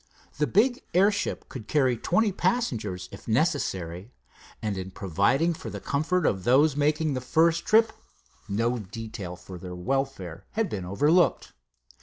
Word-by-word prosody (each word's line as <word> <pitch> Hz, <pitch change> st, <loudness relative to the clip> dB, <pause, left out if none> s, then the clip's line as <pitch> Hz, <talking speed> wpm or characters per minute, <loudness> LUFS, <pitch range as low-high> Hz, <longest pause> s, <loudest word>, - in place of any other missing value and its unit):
The 150 Hz, -, +2 dB
big 245 Hz, +7 st, +2 dB
airship 200 Hz, +2 st, +2 dB
could 115 Hz, -5 st, -9 dB
carry 130 Hz, -5 st, +2 dB
twenty 200 Hz, -, +1 dB
passengers, 110 Hz, -, -1 dB
if -, -, -12 dB
necessary, 105 Hz, -, -1 dB, 0.5 s
and 105 Hz, -2 st, -2 dB
in 95 Hz, 0 st, -5 dB
providing 100 Hz, -, +1 dB
for -, -, -7 dB
the -, -, -6 dB
comfort 160 Hz, +5 st, 0 dB
of 95 Hz, -2 st, +1 dB
those 135 Hz, +6 st, +4 dB
making 150 Hz, +1 st, +1 dB
the 130 Hz, -, -2 dB
first 165 Hz, +6 st, +2 dB
trip 220 Hz, +1 st, +4 dB, 0.6 s
no 115 Hz, +4 st, 0 dB
detail 105 Hz, -3 st, -7 dB
for 90 Hz, 0 st, -10 dB
their 90 Hz, 0 st, -7 dB
welfare 110 Hz, -5 st, -3 dB
had 220 Hz, -1 st, 0 dB
been 95 Hz, -4 st, -4 dB
overlooked. 145 Hz, -, +2 dB
130 Hz, 145 wpm, -27 LUFS, 95-165 Hz, 0.6 s, those